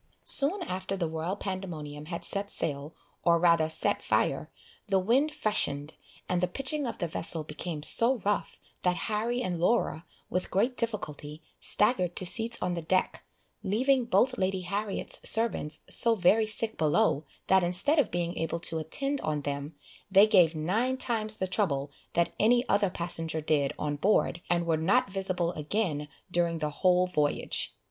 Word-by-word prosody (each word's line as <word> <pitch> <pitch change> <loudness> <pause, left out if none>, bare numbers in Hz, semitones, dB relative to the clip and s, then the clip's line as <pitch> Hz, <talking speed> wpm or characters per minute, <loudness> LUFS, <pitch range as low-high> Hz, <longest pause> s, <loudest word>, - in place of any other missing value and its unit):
Soon 340 +8 +6
after 190 - -4
the 170 -3 -1
Royal 160 +4 -3
Pandemonium 165 -7 -6
had 170 +1 -5
set 200 0 -1
sail, 145 -2 -2 0.3
or 170 -1 +4
rather 165 -2 +3
set 160 - +1
fire, - - 0 0.4
the 195 -2 +2
wind 245 +11 +2
freshened, 155 - -1 0.3
and 180 -1 0
the 180 - +2
pitching 275 +8 0
of 235 - -5
the 175 - -2
vessel 165 0 -3
became 150 0 -6
so 240 +10 +4
rough, 205 0 -1 0.2
that 180 -1 +1 0.2
Harry 235 +4 -1
and 175 -5 -3
Laura, 175 -3 0 0.2
with 180 - -3
great 235 +7 0
difficulty, 155 -10 -5 0.2
staggered 185 -5 +1
to 185 - -4
seats 225 +5 0
on 180 - -1
the 170 - -3
deck, 185 +3 -1 0.4
leaving 250 +6 +1
both 245 +4 +1
Lady 190 0 0
Harriet's 200 +3 -1
servants 225 -9 +2
so 230 -1 +4
very 215 +3 +3
sick 220 +1 -2
below, 155 0 +2 0.2
that 190 0 +4
instead 190 - +2
of 280 - +2
being 175 0 -3
able 165 +1 -2
to 165 -1 -1
attend 275 - -2
on 150 -1 -2
them, 145 +2 -5 0.3
they 195 +2 +7
gave 180 -7 +4
nine 220 +12 -1
times 220 -4 -1
the 190 - -1
trouble 150 -8 -1 0.2
that 170 0 +1
any 240 +3 +3
other 200 -1 +2
passenger 165 -2 -1
did 150 -3 0
on 145 -1 -3
board, 185 -1 +1
and 170 -1 +1
were 165 -1 +1
not 200 +9 +1
visible 185 -3 -1
again 155 -2 -2 0.2
during 170 -1 0
the 150 -2 -3
whole 180 -1 +4
voyage. 150 -5 -1
180 Hz, 165 wpm, -28 LUFS, 160-215 Hz, 0.4 s, they